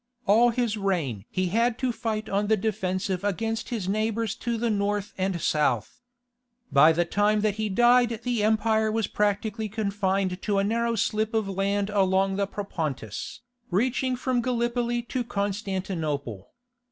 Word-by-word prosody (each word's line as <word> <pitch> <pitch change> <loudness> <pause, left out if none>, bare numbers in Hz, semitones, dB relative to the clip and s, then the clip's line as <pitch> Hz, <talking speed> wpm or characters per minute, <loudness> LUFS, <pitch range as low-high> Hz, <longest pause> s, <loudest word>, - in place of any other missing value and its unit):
All 225 +4 +5
his 235 -2 -1
reign 160 - -1
he 185 -1 -1
had 230 +4 +1
to 255 -1 0
fight 220 -2 -3
on 205 0 0
the 220 0 +3
defensive 190 -2 -2
against 225 +3 -2
his 220 -7 -3
neighbours 220 +1 0
to 235 -1 -2
the 230 0 0
north 205 0 -1
and 185 -2 -1
south. 150 - 0 0.7
By 155 +3 +7
the 170 +2 +1
time 205 +4 +2
that 210 -1 0
he 215 - 0
died 240 +2 +4
the 245 -3 0
empire 220 0 +2
was 225 -1 0
practically 210 +2 -1
confined 195 -3 -1
to 205 -1 0
a 195 - +3
narrow 230 +3 0
slip 220 0 0
of 220 -2 +1
land 200 +1 -1
along 195 -1 +2
the 200 -1 0
Propontis, 155 - -5 0.3
reaching 255 +5 +1
from 250 0 0
Gallipoli 240 0 0
to 245 +1 -3
Constantinople. 190 - -3
210 Hz, 155 wpm, -26 LUFS, 190-225 Hz, 0.7 s, By